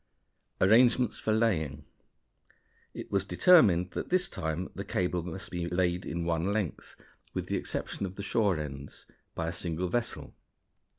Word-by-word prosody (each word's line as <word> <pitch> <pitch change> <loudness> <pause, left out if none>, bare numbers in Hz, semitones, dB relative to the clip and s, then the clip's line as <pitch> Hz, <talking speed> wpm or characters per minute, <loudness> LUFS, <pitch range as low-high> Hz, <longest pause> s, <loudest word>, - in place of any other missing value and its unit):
Arrangements 120 +3 +4
for 110 - -1
Laying. 80 - 0 1.1
It - - -9
was 100 -1 +1
determined 100 - +5
that - - -5
this 185 +1 +2
time 80 - -4
the 100 - -5
cable 90 -2 -1
must 90 +2 -7
be 90 -1 -3
laid 90 +1 0
in 85 0 -3
one 85 +3 0
length, 100 -6 -3 0.4
with - - -2
the - - -1
exception 100 - -3
of 95 - -10
the 100 - -6
shore 100 -6 +1
ends, 70 -2 -7 0.3
by 80 - -2
a 85 - -2
single 85 +1 -2
vessel. 120 +5 -2
90 Hz, 155 wpm, -29 LUFS, 85-105 Hz, 1.1 s, determined